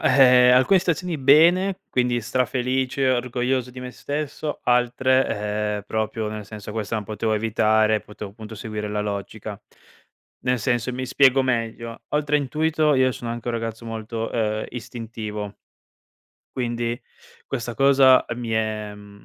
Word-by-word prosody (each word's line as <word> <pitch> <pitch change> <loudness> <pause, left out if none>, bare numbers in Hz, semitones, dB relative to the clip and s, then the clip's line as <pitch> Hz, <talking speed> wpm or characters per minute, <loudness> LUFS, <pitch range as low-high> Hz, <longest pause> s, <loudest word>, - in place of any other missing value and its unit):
alcune 125 +5 +6
stazioni 175 -2 -1
bene, 175 +8 +4
quindi 125 -1 +1
strafelice, 130 +2 0
orgoglioso 125 0 -1
di 125 - -11
me 125 0 -6
stesso, 150 +2 -4
altre, 120 -4 +1
ehm, 105 - -6
proprio 110 0 -2
nel 105 -1 -6
senso: 105 0 -8
"Questa 110 0 -3
non 110 -1 -2
potevo 110 +2 -1
evitare, 110 0 +2
potevo 105 -1 -9
appunto 110 +2 -10
seguire 105 0 -5
la 105 0 -2
logica". 100 -2 -5 0.8
Nel 125 0 +1
senso, 120 +2 -1
mi 130 +1 -3
spiego 135 +1 +4
meglio: 115 -2 -3
oltre 150 0 +2
intuito 155 +2 +1
io 130 -1 +3
sono 120 -1 -6
anche 120 0 -6
un 120 - -1
ragazzo 115 0 -4
molto, 115 0 -4
ehm, 110 -2 -1
istintivo. 110 -4 -6 1.0
Quindi, 120 -1 -2 0.5
questa 120 0 -4
cosa 135 0 +5
mi 120 -2 -5
è, 110 -1 -2
mhmm, 100 0 -15
120 Hz, 135 wpm, -23 LUFS, 110-130 Hz, 1.0 s, alcune